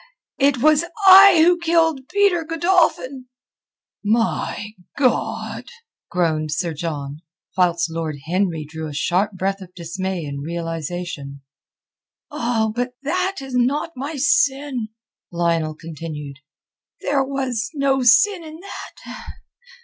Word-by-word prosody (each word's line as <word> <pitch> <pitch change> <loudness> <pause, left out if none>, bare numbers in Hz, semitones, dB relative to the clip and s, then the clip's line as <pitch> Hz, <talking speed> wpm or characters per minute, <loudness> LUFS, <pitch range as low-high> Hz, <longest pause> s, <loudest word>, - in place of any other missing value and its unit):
it 280 -1 +3
was 310 +1 +5 0.2
I 380 -3 +9
who 350 0 +4
killed 325 -5 +1
Peter 400 -4 +2
Godolphin." 320 -6 +1 0.8
"My 215 -1 0 0.3
God!" 260 -4 -1 0.4
groaned 155 -3 0
Sir 165 +2 -1
John, 150 -2 -5 0.4
whilst 175 -2 +2
Lord 160 -2 -3
Henry 170 -2 -1
drew 160 +1 -6
a 145 - -8
sharp 185 +7 0
breath 195 +1 -2
of 180 -1 -12
dismay 180 0 -4
and 140 -1 -5
realization. 165 -3 -5 0.9
"Ah, 235 -6 0
but 245 +1 -2
that 365 +4 -1
is 265 -1 -8
not 265 +7 +1
my 280 +5 -5
sin," 280 - +1 0.4
Lionel 170 -2 0
continued. 155 -3 -8 0.6
"There 280 -1 +1
was 260 -4 -2
no 275 -1 +1
sin 335 - +4
in 315 0 -10
that. 400 - -9
225 Hz, 115 wpm, -21 LUFS, -, 0.9 s, I